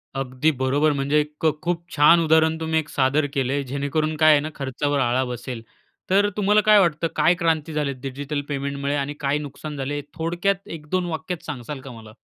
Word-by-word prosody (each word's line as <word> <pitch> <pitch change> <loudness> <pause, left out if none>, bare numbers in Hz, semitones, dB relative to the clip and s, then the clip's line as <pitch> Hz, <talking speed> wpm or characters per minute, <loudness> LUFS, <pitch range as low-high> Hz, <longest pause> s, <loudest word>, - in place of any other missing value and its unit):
अगदी 135 +3 0
बरोबर 145 +4 +2
म्हणजे 140 +1 +1
एक 150 0 -6
क 160 -1 +4
खूप 170 -1 -1
छान 155 +3 +6
उदाहरण 160 0 +3
तुम्ही 160 0 0
एक 150 -1 -6
सादर 140 +2 +1
केलंय 140 +1 0
जेणेकरून 155 +3 -1
काय 155 0 +6
आहे 145 - +6
ना 155 - -4
खर्चावर 140 +1 -1
आळा 130 +1 +2
बसेल. 125 -1 -6 0.5
तर 200 +2 +4
तुम्हाला 210 +1 +4
काय 210 -1 +7
वाटतं 165 -2 +2
काय 155 +3 +4
क्रांती 160 -3 0
झाले 145 -2 -1
डिजिटल 140 +2 -4
पेमेंटमुळे 140 0 -2
आणि 145 +1 -2
काय 140 +1 0
नुकसान 150 +1 -7
झाले 145 +2 -3
थोडक्यात 175 +4 -1
एक 150 -1 -11
दोन 185 -1 0
वाक्यात 160 +2 -4
सांगासाल 135 -1 -6
का 135 - -10
मला? 110 -2 -12
150 Hz, 190 wpm, -23 LUFS, 140-160 Hz, 0.5 s, काय